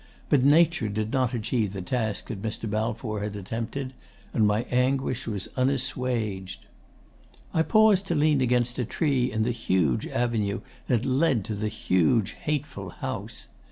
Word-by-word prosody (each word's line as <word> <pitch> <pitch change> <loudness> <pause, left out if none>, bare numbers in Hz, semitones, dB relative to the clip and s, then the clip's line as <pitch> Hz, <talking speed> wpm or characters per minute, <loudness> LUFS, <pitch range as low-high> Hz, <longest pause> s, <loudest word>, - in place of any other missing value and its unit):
But 140 -4 +4
Nature 155 -4 +4
did 110 +3 -2
not 130 -2 +1
achieve 110 -3 -1
the 100 - -4
task 110 0 -2
that 100 -4 -5
Mr. 110 +1 -3
Balfour 110 0 -2
had 105 0 -3
attempted; 115 +6 -4 0.4
and 110 -2 +3
my 105 +2 +2
anguish 130 0 +1
was 100 -4 -3
unassuaged. 125 -7 -1 0.9
'I 160 - +3
paused 210 0 +4
to 170 - 0
lean 150 -2 +3
against 125 -1 +1
a - - +2
tree 130 -1 +1
in 110 0 0
the 120 - +1
huge 95 - +1
avenue 110 -5 -1 0.3
that 120 -1 +1
led 130 - +2
to 110 - -3
the 105 +1 -2
huge 95 +1 +2
hateful 140 - -4
house. 115 -1 -6
120 Hz, 155 wpm, -26 LUFS, 105-130 Hz, 0.9 s, But